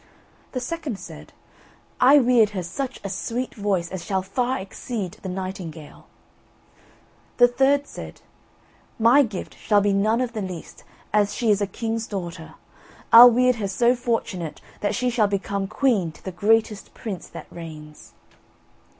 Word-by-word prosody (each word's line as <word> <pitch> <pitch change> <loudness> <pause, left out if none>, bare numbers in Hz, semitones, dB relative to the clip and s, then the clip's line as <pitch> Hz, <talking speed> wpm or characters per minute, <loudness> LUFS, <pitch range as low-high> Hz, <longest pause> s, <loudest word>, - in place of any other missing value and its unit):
The 255 - -1
second 295 - -4
said: 190 - -11 0.7
"I 275 +3 +7
weird 245 -5 +4
her 180 - -2
such 260 +10 -5
a - - -3
sweet 240 +6 -3
voice 195 -5 -1
as 185 -2 -5
shall 190 0 -1
far 250 +6 -1
exceed 195 0 -6
the 190 - -5
nightingale." 180 -5 -7 1.3
The 245 - +7
third 270 +3 +2
said: - - -10 0.8
"My 235 +5 +6
gift 215 -8 -4
shall 205 -2 +3
be 200 0 +2
none 215 +4 +2
of 250 -2 -2
the 215 - -3
least, 185 -4 -8 0.3
as 210 -1 +2
she 230 -3 +2
is 205 0 +2
a 200 - +1
king's 225 +2 -3
daughter, 175 -5 -6 0.6
I'll 240 +2 +12
weird 250 +1 +3
her 205 -3 -2
so 235 +6 +2
fortunate 230 - -3 0.2
that 205 0 -1
she 250 0 0
shall 220 -3 +2
become 200 0 -2
queen 215 - +1
to - - -19
the 190 - -4
greatest 215 +2 +1
prince 200 -6 -6
that - - -10
reigns." 155 -3 -11
210 Hz, 155 wpm, -23 LUFS, 190-245 Hz, 1.3 s, I'll